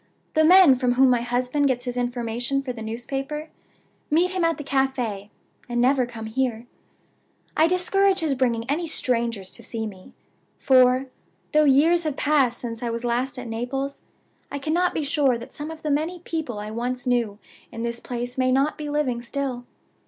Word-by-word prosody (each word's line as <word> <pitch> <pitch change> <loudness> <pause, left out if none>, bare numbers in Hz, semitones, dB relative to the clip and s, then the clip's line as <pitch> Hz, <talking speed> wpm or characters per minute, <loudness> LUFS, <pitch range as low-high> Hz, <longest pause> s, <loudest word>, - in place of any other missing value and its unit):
The 315 - +4
men 355 -3 +8
from 250 -1 +1
whom 260 +1 +5
my 245 -1 +2
husband 250 +4 0
gets 250 -2 -1
his 245 -1 -3
information 245 +2 -1
for 255 -2 -4
the 230 - -9
newspaper 270 +7 -4 0.6
meet 345 +4 +3
him 370 -2 -1
at 330 0 +2
the 295 - -6
cafe, 255 -7 -1 0.4
and 240 0 -1
never 255 0 +3
come 225 -2 -8
here. 235 0 -2 0.9
I 315 +1 +5
discourage 380 +2 +2
his 310 -3 +1
bringing 240 -3 0
any 320 +5 -1
strangers 235 -9 -1
to - - -11
see 225 -1 -4
me; 190 -3 -10 0.4
for, 255 0 +4 0.5
though 305 0 +4
years 320 +5 +4
have 300 -2 -2
passed 275 -5 +2
since 230 -2 -5
I 240 - -2
was 230 +1 -4
last 245 +2 -1
at 250 - -6
Naples, 260 +5 -3 0.5
I 285 - -3
cannot 330 +5 0
be 310 - 0
sure 280 -3 +2
that 235 - -10
some 295 +1 -6
of 320 -1 -9
the 305 - 0
many 315 +5 0
people 315 -10 -4
I 210 +1 -5
once 245 +2 -3
knew 240 -5 0 0.3
in 230 -1 -5
this 235 0 -3
place 245 +1 -5
may 255 0 +3
not 275 +4 +1
be 300 -1 -4
living 280 -5 0
still. 250 -1 -4
255 Hz, 185 wpm, -24 LUFS, 240-295 Hz, 0.9 s, men